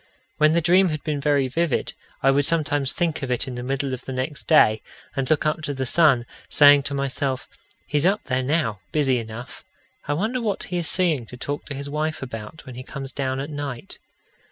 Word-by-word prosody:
When 155 +1 +4
the 170 - +3
dream 180 +2 +4
had 155 -2 -4
been 150 -3 -2
very 140 -2 +2
vivid, 165 +2 -1 0.3
I 135 - +5
would 140 0 +3
sometimes 145 -4 +2
think 170 -3 -1
of 135 - -4
it 125 0 0
in 130 - -5
the 125 - -5
middle 135 +1 -2
of 130 - -6
the - - -5
next 130 +3 -4
day, 110 -9 +5 0.3
and 135 -2 -1
look 155 -1 +2
up 155 0 0
to 145 -2 -4
the 130 0 -2
sun, 135 -4 +4 0.2
saying 145 -1 +7
to 140 - -3
myself: 140 -1 -2 0.4
He's 150 +3 +2
up 200 +3 +1
there 130 -1 -1
now, 130 - 0
busy 135 -5 +2
enough. 115 +2 -9 0.4
I - - +1
wonder 220 +11 -1
what 210 -4 -2
he 180 - -4
is 170 -2 0
seeing 160 -10 +1
to 125 - -10
talk 145 +3 -4
to 145 - -5
his 140 +1 -5
wife 155 +1 -2
about 115 +4 -8
when 130 - -9
he 125 - -7
comes 135 0 -7
down 130 -1 -2
at 140 +3 -5
night? 145 -4 -6
140 Hz, 220 wpm, -23 LUFS, 130-155 Hz, 0.4 s, saying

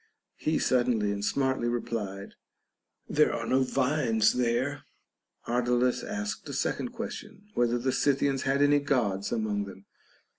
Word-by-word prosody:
He 155 0 0
suddenly 120 -5 +2
and 100 0 -3
smartly 130 +3 0
replied, 105 -5 -3 0.7
There - - +3
are - - -3
no 130 +1 +2
vines 130 -4 +2
there. 125 +4 0 0.6
Ardalus 125 +1 +1
asked 210 0 -4
a - - -5
second - - -1
question, 220 -3 -7
whether 120 0 +2
the 130 +2 0
Scythians 135 0 +1
had 140 +1 +2
any 145 0 +5
Gods 115 -9 0
among 105 -3 -1
them. 95 0 -12
125 Hz, 135 wpm, -28 LUFS, 110-140 Hz, 0.7 s, any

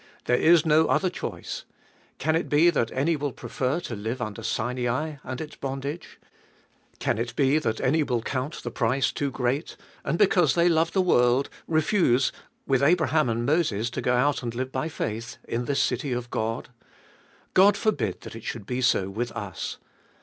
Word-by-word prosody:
There 125 - +3
is 165 +4 +5
no 160 0 +4
other 185 -2 +2
choice - - -5 0.3
— - - -34
can 155 +3 +1
it 165 - -1
be 160 +4 +5
that 120 -8 0
any 150 +6 +1
will 145 -1 -2
prefer 130 +5 -2
to 120 - -5
live 110 +5 -4
under 110 -4 -4
Sinai 125 +6 -2
and 130 -1 -5
its 155 -1 -7
bondage? 140 +4 -5 0.8
Can - - -1
it 120 0 -3
be 140 +2 +3
that 110 -8 -2
any 155 +5 +2
will 125 -6 -1
count 135 +5 -3
the - - -4
price 130 +3 +1
too 145 - -2
great, 130 +3 -2 0.3
and, 170 - -1
because 175 -8 +4
they 170 0 +4
love 165 0 +2
the 190 - +3
world, 125 -5 +3 0.2
refuse, 155 - +2 0.3
with 135 -1 +2
Abraham 155 -2 +3
and 115 +1 -1
Moses, 120 -7 +1
to - - -3
go 125 - +2
out 140 +3 +2
and 120 -2 -4
live 130 +1 -3
by 135 +5 -2
faith, 115 -5 -4
in 120 +1 -2
this 140 +1 0
city 130 +2 -1
of 120 0 -4
God. 115 +2 -2 0.8
God 200 +2 +6
forbid 120 - -1
that - - -9
it 115 - -9
should 115 -3 -5
be 125 +3 -2
so 110 -6 +2
with 115 +5 -3
us. 100 -7 -5
130 Hz, 185 wpm, -26 LUFS, 120-155 Hz, 0.8 s, God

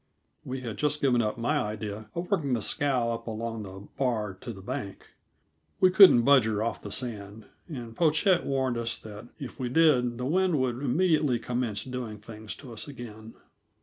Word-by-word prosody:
We 130 0 -5
had 115 -4 -5
just 150 0 0
given 125 -4 +3
up 105 0 -1
my 145 +6 +1
idea 105 -1 -4
of 175 +3 -4
working 145 -9 +1
the 115 -3 0
scow 130 -6 +1
up 115 0 -5
along 115 0 -4
the 95 0 -9
bar 110 -7 0
to 95 +6 -8
the 100 - -10
bank. 100 0 -6 0.7
We 185 -1 +5
couldn't 185 - +8
budge 140 -2 +6
her 110 -1 0
off 115 - -3
the - - -8
sand, 110 -3 -5 0.2
and 120 -7 -7
Pochette 170 - +3
warned 130 -3 0
us 115 0 -2
that 110 +2 -10
if 135 - -8
we 125 -2 -2
did 125 -5 +3
the 125 - -3
wind 180 +1 +2
would 125 -2 0
immediately 150 -2 +2
commence 120 -3 -2
doing 125 -4 -5
things 110 0 -8
to 130 -5 -11
us 110 - -4
again. 115 -5 -10
120 Hz, 185 wpm, -28 LUFS, 110-140 Hz, 0.7 s, couldn't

